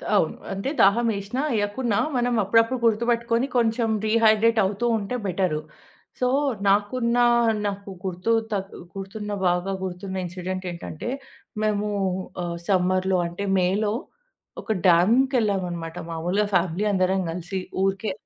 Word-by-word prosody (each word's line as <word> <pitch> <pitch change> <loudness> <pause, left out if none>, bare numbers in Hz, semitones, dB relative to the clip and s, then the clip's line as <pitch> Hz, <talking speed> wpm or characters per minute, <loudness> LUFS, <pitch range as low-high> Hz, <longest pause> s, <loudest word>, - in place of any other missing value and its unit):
అవును. - - +2 0.2
అంటే 195 +7 -3
దాహం 230 +5 +4
ఏసినా, 200 +7 -3 0.2
ఏయకున్నా 205 +1 0 0.2
మనం 245 0 +1
అప్పుడప్పుడు 225 +5 +3
గుర్తుపెట్టుకొని, 235 +2 +1
కొంచెం 230 0 +2 0.2
డీహైడ్రేట్ 220 0 +4
అవుతూ 205 +5 -2
ఉంటే 210 +3 -4
బెటరు. 180 -4 0 0.6
సో, 250 - +2 0.4
నాకున్న 235 +4 +2 0.5
నాకు 200 0 -4 0.2
గుర్తు 185 +4 -1 0.2
తక్ 195 -1 -3 0.2
గుర్తున్న 205 +2 -6 0.2
బాగా 180 +2 0
గుర్తున్న 190 +1 -5
ఇన్సిడెంట్ 185 +1 -5
ఏంటంటే, 170 +3 -6 0.5
మేము 210 -1 0 0.6
ఆహ్, 170 -1 -3
సమ్మర్‌లో 185 0 +2
అంటే 175 +4 -5
మే‌లో 200 +4 +1 0.7
ఒక - - -4 0.2
డ్యామ్‌కెళ్ళామనమాట. 185 - +2
మాములుగా 175 +6 0
ఫ్యామిలీ 180 +3 +1
అందరం 190 0 +2
కలిసి 180 +3 -4 0.2
ఊరికే 195 +2 0
200 Hz, 115 wpm, -24 LUFS, 185-225 Hz, 0.7 s, దాహం